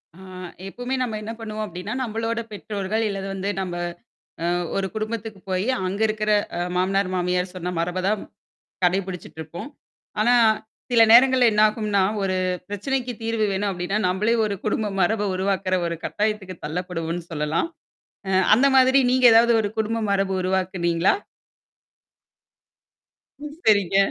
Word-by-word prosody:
ஆ, -, -, -16 dB, 0.5 s
எப்பவுமே 245 Hz, +5 st, -4 dB
நம்ம 225 Hz, -4 st, -2 dB
என்ன 220 Hz, -, -5 dB
பண்ணுவோம் 215 Hz, -1 st, -5 dB
அப்பிடின்னா, 180 Hz, +3 st, -6 dB
நம்பளோட 225 Hz, 0 st, -2 dB
பெற்றோர்கள் 210 Hz, +1 st, -3 dB
இல்லது 195 Hz, -1 st, -4 dB
வந்து 195 Hz, +1 st, -3 dB
நம்ப 180 Hz, -2 st, -4 dB, 0.7 s
அ -, -, 0 dB, 0.3 s
ஒரு 195 Hz, -1 st, 0 dB
குடும்பத்துக்கு 220 Hz, -1 st, -4 dB
போயி 185 Hz, +1 st, 0 dB, 0.2 s
அங்க 195 Hz, +4 st, -3 dB
இருக்கிற 215 Hz, 0 st, -1 dB, 0.3 s
அ -, -, -2 dB, 0.2 s
மாமனார், 190 Hz, +1 st, +1 dB
மாமியார் 180 Hz, 0 st, -1 dB
சொன்ன 180 Hz, 0 st, -4 dB
மரப 180 Hz, +2 st, -1 dB
தான். 210 Hz, 0 st, 0 dB, 0.6 s
கடைபிடிச்சுட்டு 180 Hz, -2 st, -1 dB
இருப்போம். 165 Hz, -, -7 dB, 0.5 s
ஆனா, 240 Hz, +3 st, +4 dB, 0.6 s
சில 235 Hz, -2 st, +5 dB
நேரங்கள்ல 255 Hz, +1 st, +7 dB
என்னாகும்ன்னா, 210 Hz, -1 st, +2 dB, 0.2 s
ஒரு 185 Hz, -1 st, 0 dB, 0.3 s
பிரச்சனைக்கு 250 Hz, +5 st, -2 dB
தீர்வு 225 Hz, -1 st, 0 dB
வேணும் 200 Hz, +1 st, -1 dB
அப்பிடின்னா, 185 Hz, +2 st, -2 dB
நம்பளே 200 Hz, +5 st, +1 dB
ஒரு 205 Hz, -1 st, -2 dB
குடும்ப 215 Hz, 0 st, 0 dB
மரப 205 Hz, +3 st, +1 dB
உருவாக்குற 190 Hz, 0 st, 0 dB
ஒரு 170 Hz, -, -3 dB
கட்டாயத்துக்கு 210 Hz, -3 st, -2 dB
தள்ளப்படுவோம்ன்னு 170 Hz, +1 st, -4 dB
சொல்லலாம். 155 Hz, -, -1 dB, 0.6 s
அ -, -, -1 dB, 0.3 s
அந்த 265 Hz, +4 st, +4 dB
மாதிரி 260 Hz, +1 st, +6 dB
நீங்க 255 Hz, -1 st, +5 dB
ஏதாவது 235 Hz, +1 st, +6 dB
ஒரு 205 Hz, -, -2 dB
குடும்ப 220 Hz, +1 st, 0 dB
மரபு 195 Hz, -1 st, +1 dB
உருவாக்குனீங்களா? 185 Hz, -2 st, +1 dB, 2.3 s
ம். 295 Hz, 0 st, -7 dB
சரிங்க. 200 Hz, -3 st, +4 dB
200 Hz, 135 wpm, -23 LUFS, 185-220 Hz, 2.3 s, நேரங்கள்ல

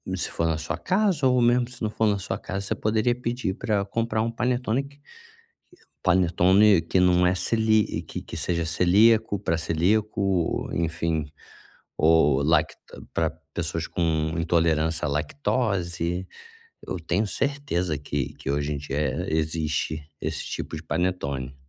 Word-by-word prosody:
se -, -, -3 dB
for 85 Hz, -, 0 dB
na 80 Hz, -1 st, 0 dB
sua 80 Hz, -, -4 dB
casa 185 Hz, -8 st, +1 dB
ou 125 Hz, -1 st, +3 dB
mesmo 120 Hz, +1 st, +3 dB
se 125 Hz, -1 st, -13 dB
não 110 Hz, -, +1 dB
for 110 Hz, 0 st, +1 dB
na 100 Hz, -1 st, +2 dB
sua -, -, -3 dB
casa, 95 Hz, +1 st, -4 dB
você -, -, -1 dB
poderia 110 Hz, +3 st, +1 dB
pedir 120 Hz, -5 st, -2 dB
para 100 Hz, -3 st, -1 dB
comprar 110 Hz, +1 st, -1 dB
um 115 Hz, +1 st, -1 dB
panetone 125 Hz, +1 st, 0 dB
que 140 Hz, +1 st, -15 dB, 1.0 s
panetone 95 Hz, +2 st, +4 dB
que 85 Hz, +3 st, 0 dB
não 90 Hz, 0 st, +4 dB
é 90 Hz, -, +2 dB
celí 110 Hz, +2 st, +1 dB
que -, -, -7 dB
que -, -, -8 dB
seja 85 Hz, -2 st, -1 dB
celíaco, 100 Hz, +6 st, +4 dB
para 85 Hz, -4 st, 0 dB
celíaco 95 Hz, +7 st, 0 dB
ou, 95 Hz, -4 st, 0 dB
enfim, 85 Hz, -2 st, -1 dB, 0.7 s
ou 75 Hz, -3 st, +4 dB
lacta 75 Hz, 0 st, +2 dB, 0.4 s
para 80 Hz, -1 st, +1 dB, 0.2 s
pessoas 85 Hz, -1 st, -3 dB
com 80 Hz, -2 st, 0 dB
intolerância 80 Hz, -1 st, +1 dB
à -, -, -2 dB
lactose. 90 Hz, -, -1 dB, 0.6 s
Eu -, -, -5 dB
tenho 90 Hz, +6 st, 0 dB
certeza 100 Hz, -, -1 dB
que 70 Hz, -2 st, -3 dB
que 70 Hz, -, -5 dB
hoje 70 Hz, +1 st, -1 dB
em -, -, -3 dB
dia, 70 Hz, 0 st, -5 dB
eh, 75 Hz, +5 st, -1 dB
existe 80 Hz, -1 st, -2 dB
esses -, -, -3 dB
tipos 80 Hz, -, -5 dB
de 80 Hz, -, -11 dB
panetone. 70 Hz, -6 st, -2 dB
90 Hz, 155 wpm, -25 LUFS, 80-110 Hz, 1.0 s, panetone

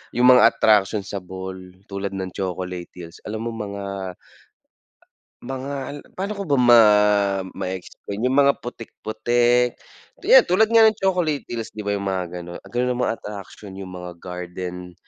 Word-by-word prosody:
yung 125 Hz, +1 st, +5 dB
mga 115 Hz, -2 st, +7 dB
attraction 105 Hz, -1 st, +3 dB
sa 100 Hz, -, -5 dB
Bohol 95 Hz, 0 st, -9 dB
tulad 100 Hz, 0 st, -4 dB
ng 95 Hz, -1 st, -4 dB
Chocolate 90 Hz, -2 st, -4 dB
hills, 85 Hz, -2 st, -10 dB
alam 110 Hz, +2 st, -4 dB
mo 115 Hz, -, -3 dB
mga 100 Hz, -3 st, -5 dB, 1.3 s
mga 135 Hz, +2 st, -5 dB, 0.2 s
al 145 Hz, -, -6 dB, 0.2 s
pa'no 200 Hz, +2 st, -3 dB
ko 200 Hz, -, -3 dB
ba 140 Hz, -3 st, +2 dB
ma 120 Hz, -1 st, +9 dB, 0.8 s
ma-explain 95 Hz, +3 st, -6 dB
yung 130 Hz, +2 st, +1 dB
mga 140 Hz, 0 st, +6 dB
putik 120 Hz, -2 st, -8 dB
putik, 120 Hz, +3 st, +2 dB, 0.5 s
yan, 485 Hz, +7 st, +7 dB
tulad 215 Hz, +5 st, +3 dB
nga 230 Hz, -1 st, +7 dB
ng 220 Hz, -, +5 dB
Chocolate 180 Hz, -6 st, +1 dB
hills 115 Hz, -2 st, -5 dB
di 110 Hz, -, -6 dB
ba 100 Hz, 0 st, -1 dB
yung 100 Hz, 0 st, -4 dB
mga 95 Hz, -2 st, -1 dB
ganun. 85 Hz, 0 st, -8 dB
Ganun 125 Hz, +1 st, 0 dB
ang 125 Hz, -, -3 dB
mga 115 Hz, -, 0 dB
attraction, 100 Hz, -1 st, -9 dB
yung 95 Hz, -1 st, -8 dB
mga 90 Hz, 0 st, -7 dB
garden 90 Hz, 0 st, -6 dB
105 Hz, 165 wpm, -22 LUFS, 95-125 Hz, 1.3 s, ma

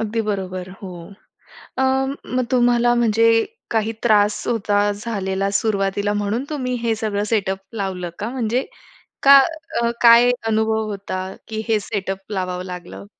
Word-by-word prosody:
अगदी 225 Hz, +1 st, -1 dB
बरोबर. 185 Hz, -2 st, -3 dB
हो. 190 Hz, -, -6 dB, 0.9 s
अ, -, -, +2 dB, 0.5 s
मग 255 Hz, -, +2 dB
तुम्हाला 240 Hz, -1 st, +3 dB
म्हणजे 230 Hz, -1 st, +3 dB, 0.3 s
काही 225 Hz, 0 st, 0 dB
त्रास 210 Hz, -3 st, +3 dB
होता, 205 Hz, -3 st, +1 dB
झालेला 200 Hz, -2 st, -2 dB
सुरुवातीला 205 Hz, -1 st, 0 dB
म्हणून 215 Hz, +6 st, -1 dB
तुम्ही 255 Hz, -4 st, -2 dB
हे 230 Hz, -1 st, +1 dB
सगळं 210 Hz, -2 st, -2 dB
सेटअप 195 Hz, -3 st, 0 dB, 0.2 s
लावलं 185 Hz, -4 st, -3 dB
का? 210 Hz, +2 st, -3 dB
म्हणजे 250 Hz, 0 st, -1 dB, 0.6 s
का 275 Hz, 0 st, +9 dB, 0.5 s
अ, 235 Hz, -, +2 dB
काय 235 Hz, +1 st, +7 dB, 0.2 s
अनुभव 220 Hz, 0 st, +1 dB
होता 195 Hz, -2 st, -5 dB, 0.3 s
की 220 Hz, 0 st, -4 dB
हे 215 Hz, -2 st, +2 dB
सेटअप 195 Hz, -1 st, -5 dB
लावावं 185 Hz, -1 st, -3 dB
लागलं? 180 Hz, +1 st, -8 dB
215 Hz, 135 wpm, -21 LUFS, 195-230 Hz, 0.9 s, का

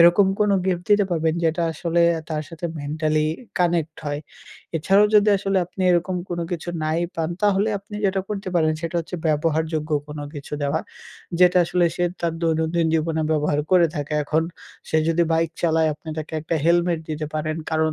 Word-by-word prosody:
এরকম 175 Hz, +4 st, +7 dB
কোনো 205 Hz, -1 st, +4 dB
gift 175 Hz, -2 st, 0 dB
দিতে 205 Hz, -1 st, +5 dB
পারবেন, 160 Hz, -1 st, +1 dB
যেটা 165 Hz, +1 st, +1 dB
আসলে 170 Hz, +2 st, +1 dB, 0.3 s
তার 155 Hz, -1 st, -1 dB
সাথে 165 Hz, +1 st, -5 dB
mentally 155 Hz, +1 st, 0 dB, 0.3 s
connect 170 Hz, -3 st, +1 dB
হয়। 145 Hz, 0 st, -2 dB, 0.6 s
এছাড়াও 195 Hz, +6 st, +4 dB
যদি 210 Hz, 0 st, +6 dB
আসলে 195 Hz, 0 st, +1 dB
আপনি 190 Hz, -, -10 dB
এরকম 180 Hz, +1 st, +1 dB
কোনো 170 Hz, -1 st, -2 dB
কিছু 175 Hz, 0 st, -4 dB, 0.2 s
নাই 155 Hz, +2 st, 0 dB, 0.2 s
পান। 165 Hz, 0 st, -1 dB
তাহলে 205 Hz, +1 st, +3 dB
আপনি 205 Hz, +2 st, -13 dB
যেটা 195 Hz, 0 st, +2 dB
করতে 200 Hz, -2 st, -4 dB
পারেন 155 Hz, -1 st, +3 dB
সেটা 170 Hz, +1 st, -2 dB
হচ্ছে 165 Hz, -, -11 dB, 0.2 s
ব্যবহারযোগ্য 155 Hz, 0 st, 0 dB, 0.2 s
কোনো 150 Hz, 0 st, -6 dB
কিছু 145 Hz, +1 st, -9 dB
দেওয়া। 145 Hz, +3 st, 0 dB, 0.6 s
যেটা 180 Hz, 0 st, +6 dB
আসলে 175 Hz, +1 st, +1 dB
সে 175 Hz, -, +1 dB, 0.2 s
তার 170 Hz, -1 st, 0 dB
দৈনন্দিন 160 Hz, +1 st, +1 dB
জীবনে 160 Hz, 0 st, 0 dB
ব্যবহার 150 Hz, -1 st, +1 dB
করে 175 Hz, -2 st, +6 dB
থাকে। 145 Hz, +1 st, -3 dB
এখন 155 Hz, +2 st, +1 dB, 0.5 s
সে 160 Hz, -, +2 dB
যদি 170 Hz, +1 st, +3 dB
bike 165 Hz, 0 st, +1 dB
চালায়, 160 Hz, -1 st, +3 dB
আপনি 160 Hz, +2 st, -14 dB
তাকে 155 Hz, -, -6 dB
একটা 160 Hz, +2 st, -2 dB
helmet 170 Hz, 0 st, +3 dB
দিতে 155 Hz, 0 st, -3 dB
পারেন। 155 Hz, +1 st, -2 dB
কারণ 160 Hz, 0 st, +1 dB
165 Hz, 175 wpm, -23 LUFS, 155-175 Hz, 0.6 s, এরকম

